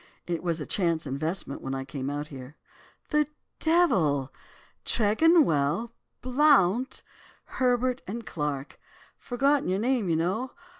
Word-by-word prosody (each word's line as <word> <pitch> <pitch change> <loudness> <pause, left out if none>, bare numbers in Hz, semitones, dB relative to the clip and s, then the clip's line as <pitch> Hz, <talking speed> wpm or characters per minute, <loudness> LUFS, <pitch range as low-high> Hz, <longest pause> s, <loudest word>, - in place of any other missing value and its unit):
'It 170 -2 -2
was 170 -2 -1
a 150 - -4
chance 170 -4 0
investment 140 +2 -3
when 135 0 -4
I 135 0 -4
came 135 0 -4
out 145 +1 -4
here.' 135 +1 -10 0.5
"'The 300 -1 +3 0.3
devil! 180 - +2 0.5
Tregonwell, 220 - +3 0.3
Blount, 255 -4 +3 0.4
Herbert 250 0 0
and 225 +4 -5
Clarke. 150 -5 -4 0.4
Forgotten 275 0 +1
your 185 - +1
name, 235 -2 0
you 165 - +2
know. 195 +10 -1
185 Hz, 120 wpm, -27 LUFS, -, 0.5 s, The